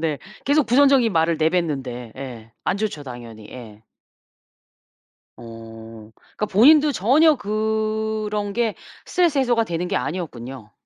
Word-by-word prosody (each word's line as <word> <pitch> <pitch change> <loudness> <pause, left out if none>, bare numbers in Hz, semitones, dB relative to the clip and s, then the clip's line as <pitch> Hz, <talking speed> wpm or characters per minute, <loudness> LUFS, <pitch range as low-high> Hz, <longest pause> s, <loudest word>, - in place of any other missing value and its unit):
네. 155 -4 -1 0.3
계속 290 0 +2
부정적인 265 -3 +4
말을 165 0 +2
내뱉는데. 140 -8 -1
예. 120 -4 -9
안 185 - 0
좋죠 200 -8 -3
당연히. 120 -5 -10
예. 110 -4 -11 1.6
어 115 -1 -11
그러니까 210 - -6
본인도 295 +9 +5
전혀 295 - +4
그런 215 -1 -2
게 230 -2 0 0.3
스트레스 340 -5 +1
해소가 240 -4 +2
되는 175 -1 -3
게 195 - -2
아니었군요. 130 - -6
180 Hz, 270 characters per minute, -22 LUFS, -, 1.6 s, 본인도